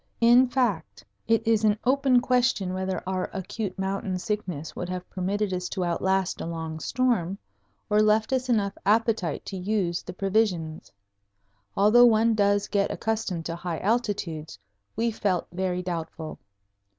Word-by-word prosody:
In 240 +2 +6
fact, 240 - -1 0.2
it 225 0 +2
is 225 -1 +3
an 210 -1 +3
open 260 -1 +3
question 245 -7 +1
whether 185 -1 -3
our 185 -1 -2
acute 190 +1 -4
mountain 190 -1 -2
sickness 180 -6 -4
would 180 - -4
have 180 0 -5
permitted 195 +2 -1
us 180 0 -3
to 185 -3 -2
outlast 190 +2 0
a - - -4
long 160 -1 -5
storm, 210 -5 0 0.5
or 210 0 +3
left 215 +3 +2
us 255 0 -1
enough 205 -4 +1
appetite 215 -6 +1
to 195 - -5
use 185 -2 -1
the 180 - -8
provisions. 185 -5 -1 0.9
Although 215 +5 +7
one 225 0 +4
does 205 -1 +2
get 200 -2 +1
accustomed 215 -7 -2
to 165 - -3
high 170 -1 -4
altitudes, 195 - -2 0.4
we 230 +1 0
felt 195 -5 -1
very 180 0 -2
doubtful. 165 -2 -5
195 Hz, 150 wpm, -26 LUFS, 180-225 Hz, 0.9 s, Although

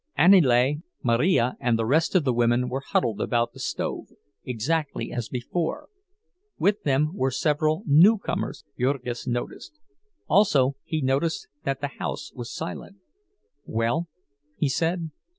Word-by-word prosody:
Aniele, 145 -7 +5 0.3
Marija, 125 +1 +2
and 120 -2 +1
the 115 - -1
rest 155 - +2
of 180 - +4
the 130 -3 +1
women 120 +1 +2
were 135 - -2
huddled 115 -6 0
about 120 -1 0
the - - -13
stove, - - -3 0.4
exactly 140 +5 -2
as 120 -2 -4
before; 165 - -3 0.7
with 205 +1 +1
them 145 +2 +1
were 135 -9 0
several 155 - 0
newcomers, 185 +9 +3
Jurgis 125 -2 -2
noticed—also 205 - -1
he 155 -1 -2
noticed 140 +5 0 0.2
that 135 0 -2
the 145 -1 -3
house - - -4
was 120 -2 -7
silent. 170 +4 -6 0.7
"Well?" 115 +10 0 0.5
he 150 - +1
said. 165 +3 -1
140 Hz, 130 wpm, -25 LUFS, 125-165 Hz, 0.7 s, Aniele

